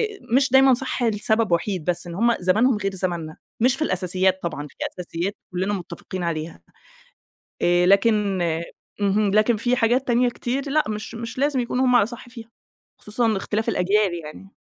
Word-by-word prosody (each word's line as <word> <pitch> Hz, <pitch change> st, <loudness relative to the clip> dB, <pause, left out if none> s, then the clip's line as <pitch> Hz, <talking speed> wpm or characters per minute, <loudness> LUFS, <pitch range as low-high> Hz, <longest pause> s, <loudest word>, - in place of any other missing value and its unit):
آآ، 395 Hz, -, -16 dB, 0.2 s
مش 270 Hz, -1 st, +3 dB
دايمًا 265 Hz, 0 st, +6 dB
صح 255 Hz, 0 st, -1 dB
لسبب 220 Hz, -1 st, +1 dB
وحيد 170 Hz, 0 st, -1 dB
بس، 175 Hz, 0 st, -1 dB
إن 170 Hz, -, -7 dB
هُم 235 Hz, +4 st, +2 dB
زمَنهم 215 Hz, +7 st, +3 dB
غير 195 Hz, -1 st, -2 dB
زمننا، 170 Hz, -4 st, -3 dB, 0.2 s
مش 250 Hz, +3 st, +3 dB
في 295 Hz, -, -9 dB
الأساسيات 185 Hz, -, +1 dB
طبعًا، 150 Hz, -3 st, -4 dB
في -, -, -22 dB, 0.2 s
أساسيات 175 Hz, +3 st, -3 dB, 0.2 s
كلّنا 190 Hz, +3 st, -1 dB
متّفقين 185 Hz, 0 st, -6 dB
عليها 160 Hz, -1 st, -4 dB, 1.0 s
آآ، 175 Hz, 0 st, +3 dB
لكن 200 Hz, -1 st, +3 dB, 0.6 s
اهم، 205 Hz, 0 st, +2 dB
لكن 215 Hz, +1 st, +3 dB
في 245 Hz, +3 st, +1 dB
حاجات 245 Hz, +3 st, +1 dB
تانية 245 Hz, +1 st, +3 dB
كتير 265 Hz, +4 st, -3 dB
لأ 305 Hz, +2 st, +2 dB
مش 215 Hz, +2 st, -5 dB
مش 230 Hz, +1 st, -7 dB
لازم 280 Hz, -1 st, +1 dB
يكونوا 250 Hz, +2 st, 0 dB
هُم 250 Hz, -1 st, +3 dB
على 205 Hz, -, +5 dB
صح 240 Hz, +1 st, -10 dB
فيها 230 Hz, -2 st, -11 dB, 0.5 s
خصوصًا 230 Hz, +3 st, -1 dB
لاختلاف 220 Hz, +1 st, -1 dB
الأجيال 200 Hz, -1 st, +1 dB
يعني. 195 Hz, +6 st, -11 dB
210 Hz, 170 wpm, -23 LUFS, 185-240 Hz, 1.0 s, دايمًا